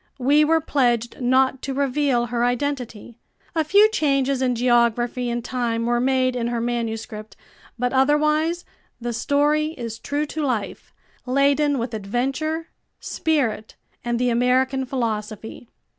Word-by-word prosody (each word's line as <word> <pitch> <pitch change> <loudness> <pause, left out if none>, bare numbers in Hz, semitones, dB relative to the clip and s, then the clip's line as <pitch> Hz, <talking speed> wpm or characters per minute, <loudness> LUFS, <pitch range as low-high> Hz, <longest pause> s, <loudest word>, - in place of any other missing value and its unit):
We 285 +4 +4
were 325 +2 +3
pledged 240 -5 0
not 260 +1 +2
to 270 -1 -4
reveal 275 -3 +1
her 240 0 -1
identity. 245 -3 -3 0.3
A 320 -2 +1
few 400 +8 +5
changes 275 - +1
in 250 -1 +1
geography 240 0 +1
and 235 0 -3
time 235 -2 -1
were 240 0 +1
made 255 0 +1
in 235 -1 -1
her 240 0 -2
manuscript, 225 -3 -4 0.4
but 250 +1 -1
otherwise 305 +5 +2 0.3
the 240 0 -3
story 295 +5 +1
is 230 -2 -6
true 290 +5 -2
to 310 +1 -4
life, 230 -8 -3 0.4
laden 280 +2 +2
with 235 -1 -3
adventure, 270 - -2 0.3
spirit 250 -9 -1 0.3
and 240 -1 -1
the 250 0 +1
American 260 +2 +1
philosophy. 220 -2 -4
250 Hz, 135 wpm, -22 LUFS, 235-285 Hz, 0.4 s, few